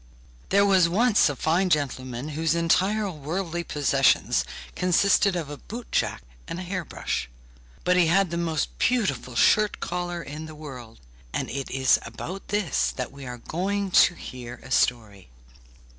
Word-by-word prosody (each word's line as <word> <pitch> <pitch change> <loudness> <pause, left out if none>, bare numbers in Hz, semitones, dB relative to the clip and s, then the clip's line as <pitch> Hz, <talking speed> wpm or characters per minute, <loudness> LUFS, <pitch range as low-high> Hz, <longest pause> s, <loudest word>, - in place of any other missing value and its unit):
There 200 +1 +4
was 190 -4 +4
once 215 0 +4
a 145 - -3
fine 170 +7 +1
gentleman 130 -3 -1
whose 160 +1 0
entire 190 +5 +2
worldly 170 +3 -3
possessions 140 - +2 0.3
consisted 185 +2 +3
of 165 -4 -3
a 145 - -6
boot 235 - -9
jack - - 0 0.2
and 175 - -5
a - - -5
hair 185 0 -3
brush; 65 - -4 0.5
but 180 - +3
he 175 -2 +5
had 185 +1 +3
the - - -2
most 165 -3 -1
beautiful 145 - 0
shirt 210 - +3
collar 175 -1 -3
in 150 +3 -7
the 155 - -10
world, 125 - -10 0.3
and - - -2
it 135 0 -4
is 130 0 +3
about 190 +2 -7
this 205 -8 0
that 125 -2 -4
we 140 -1 -10
are 125 0 -6
going 195 +8 -2
to 175 - +6
hear 125 -1 -8
a 135 - -12
story. 110 - 0
165 Hz, 160 wpm, -25 LUFS, 135-185 Hz, 0.5 s, to